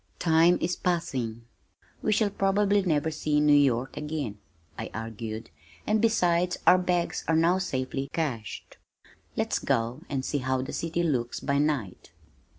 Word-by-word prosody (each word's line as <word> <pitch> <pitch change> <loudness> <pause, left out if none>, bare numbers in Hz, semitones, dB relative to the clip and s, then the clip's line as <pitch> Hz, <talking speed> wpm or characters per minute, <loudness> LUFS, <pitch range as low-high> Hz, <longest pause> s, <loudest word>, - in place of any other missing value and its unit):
"Time 165 +1 +4
is 175 +1 0
passing. 130 -10 -2 0.6
We 215 - 0
shall 215 -1 +2
probably 200 +1 +2
never 160 -4 0
see 150 -1 0
New 150 0 +5
York 135 -3 +3
again," 150 -9 -4 0.4
I - - -5
argued, 110 -1 -6 0.3
"and 215 0 +2
besides 180 -6 +2
our 185 - +7
bags 180 -1 -1
are 165 - +3
now 170 +3 +3
safely 135 -5 -3
cached. 125 -10 -4 0.6
Let's - - 0
go - - +2 0.3
out - - -17
and 135 -2 -2
see 145 - -1
how 130 0 -1
the 135 - -6
city 165 +1 -1
looks 125 -7 -1
by 140 0 0
night." 140 -13 -1
155 Hz, 155 wpm, -27 LUFS, 130-175 Hz, 0.6 s, our